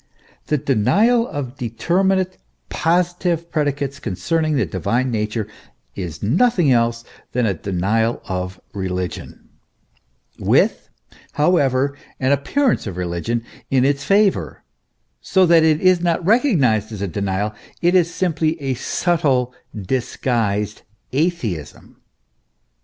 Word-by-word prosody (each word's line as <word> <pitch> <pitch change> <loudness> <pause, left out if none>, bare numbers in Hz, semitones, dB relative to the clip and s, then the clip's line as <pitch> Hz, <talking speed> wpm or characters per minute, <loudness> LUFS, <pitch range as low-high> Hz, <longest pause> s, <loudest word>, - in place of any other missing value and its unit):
The 150 - +1
denial 150 - +2
of 140 -3 -5
determinate, 185 - 0 0.3
positive 175 0 0
predicates 145 -2 -1
concerning 155 - -1
the 135 - +2
divine 125 +5 -1
nature, 105 -1 -2 0.5
is 85 -4 -6
nothing 175 - +3
else 115 -1 +2 0.3
than 125 -1 +1
a 100 - +1
denial 100 +6 0
of 90 0 -4
religion, 90 -2 -5 0.9
with, - - +2 0.4
however, 140 -3 +2 0.2
an 130 +1 +1
appearance 225 - +1
of 95 -3 -6
religion 90 +7 -2 0.3
in 130 -1 +3
its 140 0 +1
favour, 200 +3 +1 0.6
so 190 -1 +3
that 170 -1 +6
it 155 -1 +3
is 185 -1 +4
not 170 -1 0
recognised 155 - +3
as 105 -2 -5
a - - -1
denial; 100 +3 -2 0.3
it 175 +1 +4
is 175 -2 +3
simply 165 -3 0
a 135 -2 -1
subtle, 130 -2 0 0.3
disguised 105 -2 -1 0.3
atheism. 130 - -2
135 Hz, 115 wpm, -20 LUFS, 110-170 Hz, 0.9 s, that